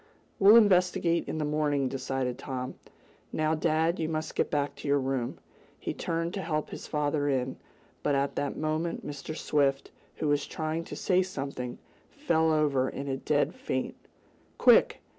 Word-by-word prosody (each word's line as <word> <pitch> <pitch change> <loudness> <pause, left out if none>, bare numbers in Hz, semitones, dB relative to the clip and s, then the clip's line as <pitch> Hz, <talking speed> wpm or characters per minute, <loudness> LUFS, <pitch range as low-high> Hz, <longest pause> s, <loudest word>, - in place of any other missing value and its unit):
"We'll 205 +3 +8
investigate 180 -5 +4
in - - -3
the 155 - -1
morning," 150 -2 +1
decided 130 -1 -2
Tom. 130 -1 -4 0.6
"Now, 155 0 +1
dad, 160 +2 +1
you 160 -1 -1
must 155 -1 -3
get - - 0
back 145 -1 0
to - - -7
your 140 0 +4
room." 130 -3 -2 0.4
He - - -3
turned 165 +1 -2
to 200 - -3
help 155 -3 -2
his - - -7
father 145 -1 0
in, 130 -1 -1 0.4
but 145 - +1
at 140 0 0
that 145 - -2
moment 155 +2 -2
Mr. 145 +2 -6
Swift, 140 -2 +1 0.2
who 155 - -2
was 145 -1 +1
trying 160 +1 -3
to - - -7
say 185 -1 +2
something, 140 -8 -4 0.3
fell 160 -1 +1
over 145 -4 +2
in 140 - -6
a 135 -1 -1
dead 145 +1 +1
faint. 130 - -3 0.6
"Quick! - - +5
150 Hz, 165 wpm, -29 LUFS, 135-160 Hz, 0.6 s, We'll